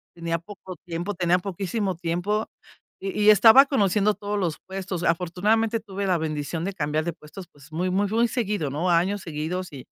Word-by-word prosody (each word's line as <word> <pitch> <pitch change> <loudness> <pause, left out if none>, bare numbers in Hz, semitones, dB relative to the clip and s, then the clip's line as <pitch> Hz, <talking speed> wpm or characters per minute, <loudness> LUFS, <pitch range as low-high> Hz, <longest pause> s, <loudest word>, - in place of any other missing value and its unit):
Tenía 170 -1 -2
poco 190 +1 -10
tiempo, 175 +4 -3
tenía 175 0 +2
poquísimo 195 +1 -3
tiempo, 175 +6 -1 0.5
y 195 0 -4
y - - +8
estaba 225 +6 +8
conociendo 210 -5 +2
todos 205 0 -3
los 170 -5 -1
puestos. 190 -2 -4
Afortunadamente, 200 +7 +1
tuve 200 -2 -5
la 180 - +2
bendición 155 +1 -3
de 195 - -3
cambiar 155 -2 -1
de 170 - -2
puestos, 165 +4 -12
pues, 145 +2 -18
muy, 180 +4 -1
muy, 200 +2 +1
muy 230 +2 +2
seguido, 210 - -1
¿no?, 165 +6 -1
a 170 - +5
años 195 +3 -2
seguidos. 170 +3 -4
Y 130 - -9
185 Hz, 185 wpm, -25 LUFS, 165-205 Hz, 0.5 s, y